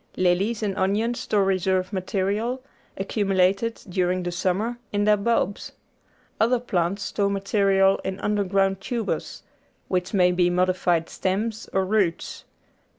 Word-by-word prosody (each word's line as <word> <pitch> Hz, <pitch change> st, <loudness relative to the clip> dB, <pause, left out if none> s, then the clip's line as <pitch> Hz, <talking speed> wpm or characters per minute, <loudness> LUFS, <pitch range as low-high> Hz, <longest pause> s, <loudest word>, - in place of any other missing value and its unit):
Lilies 195 Hz, +5 st, +1 dB
and 200 Hz, -2 st, -1 dB
onions 215 Hz, +5 st, 0 dB
store 205 Hz, -2 st, +1 dB
reserve 185 Hz, 0 st, 0 dB
material, 205 Hz, +6 st, -1 dB, 0.3 s
accumulated 195 Hz, +2 st, 0 dB
during 180 Hz, 0 st, 0 dB
the 175 Hz, -, -2 dB
summer, 195 Hz, +7 st, -1 dB
in 205 Hz, 0 st, 0 dB
their 210 Hz, 0 st, +5 dB
bulbs. 205 Hz, -1 st, -1 dB, 0.7 s
Other 240 Hz, +3 st, +3 dB
plants 195 Hz, -4 st, -1 dB
store 200 Hz, 0 st, 0 dB
material 195 Hz, -1 st, +2 dB
in 190 Hz, 0 st, -4 dB
underground 195 Hz, -2 st, +1 dB
tubers, 235 Hz, -1 st, -3 dB, 0.5 s
which 180 Hz, 0 st, -1 dB
may 180 Hz, -3 st, +4 dB
be 180 Hz, 0 st, +2 dB
modified 180 Hz, -2 st, +1 dB
stems 210 Hz, +4 st, -2 dB
or 190 Hz, 0 st, +1 dB
roots. 190 Hz, -4 st, -1 dB
195 Hz, 125 wpm, -24 LUFS, 185-210 Hz, 0.7 s, their